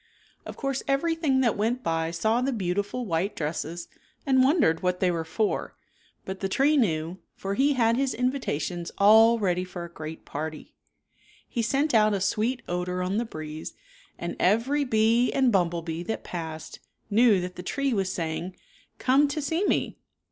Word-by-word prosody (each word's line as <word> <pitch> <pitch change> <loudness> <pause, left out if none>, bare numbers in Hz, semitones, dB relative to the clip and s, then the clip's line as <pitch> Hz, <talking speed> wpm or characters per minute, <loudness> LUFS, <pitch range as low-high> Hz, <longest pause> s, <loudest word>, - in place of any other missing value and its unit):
Of - - -8
course 275 -2 -2
everything 285 -1 +1
that 235 -4 +2
went 235 +5 -1
by 165 0 0
saw 220 +8 +1
the 270 +2 0
beau 190 -7 -1
tiful 205 +6 -2
white 190 +2 -1
dresses 165 +2 -4 0.4
and 260 -2 +4
wondered 265 - +3
what 180 0 0
they 185 -1 +2
were 165 -1 -2
for, 205 +6 -2 0.5
but 190 0 -5
the 195 - -2
tree 280 +9 +3
knew, 170 - 0 0.2
for 195 0 -4
he 275 +6 +3
had 230 -2 +2
his 270 0 0
invitations 190 - -2
all 220 +3 +7
ready 180 -4 0
for 180 -1 -7
a 170 - -12
great 155 0 -8
party. 155 +1 -6 0.7
He 235 - -2
sent 275 +6 +1
out 215 -2 +4
a - - -1
sweet 220 +6 0
odor 180 +1 -2
on 190 +3 -1
the 235 - 0
breeze 155 -5 -7 0.4
and - - -4
every 250 +9 +2
bee 230 +1 +3
and 265 -3 +3
bumble 175 -4 +1
bee 165 0 -4
that 220 +6 -4
passed 160 -2 -6 0.3
knew 220 -2 +5
that 180 0 -5
the - - -6
tree 275 +8 -1
was 195 -3 0
saying, 170 +2 -4 0.2
" - - -30
Come 275 +3 +3
to 290 +2 -3
see 320 +6 -1
me. - - 0
205 Hz, 180 wpm, -26 LUFS, 175-255 Hz, 0.7 s, all